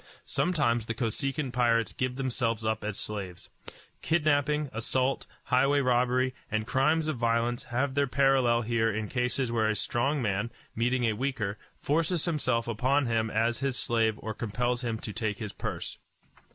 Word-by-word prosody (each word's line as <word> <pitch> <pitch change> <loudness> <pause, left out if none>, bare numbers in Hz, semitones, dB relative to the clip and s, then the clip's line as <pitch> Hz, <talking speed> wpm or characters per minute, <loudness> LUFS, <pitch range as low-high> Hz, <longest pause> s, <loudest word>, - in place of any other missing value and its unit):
Sometimes 120 -10 +1
the 115 - -2
Kosekin 135 +3 -1
pirates 115 -2 +2
give 125 -1 -2
themselves 120 -4 -1
up 110 0 0
as 105 -1 -3
slaves. 95 -5 -6 0.5
Kidnapping, 150 -3 +1
assault, 130 +4 0 0.2
highway 140 +3 +3
robbery, 125 0 +2 0.2
and 110 0 -1
crimes 150 +6 +2
of 155 -4 -1
violence 115 +1 0
have 130 +2 -1
their 140 0 +2
parallel 130 -3 +3
here 115 0 +1
in 110 0 -3
cases 125 0 0
where 110 -2 +2
a 110 - +1
strong 135 +7 0
man, 105 -1 -1 0.3
meeting 125 +2 +1
a 115 -2 +2
weaker, 110 -4 -2 0.2
forces 165 +2 0
himself 130 -9 0
upon 130 +5 +1
him 115 -1 0
as 115 +2 +1
his 135 -2 -1
slave 115 -2 +1
or 110 - -3
compels 120 +3 -1
him 115 -2 -1
to 110 -1 -6
take 110 -3 -1
his 105 -2 -5
purse. - - -5
120 Hz, 160 wpm, -29 LUFS, 115-135 Hz, 0.5 s, highway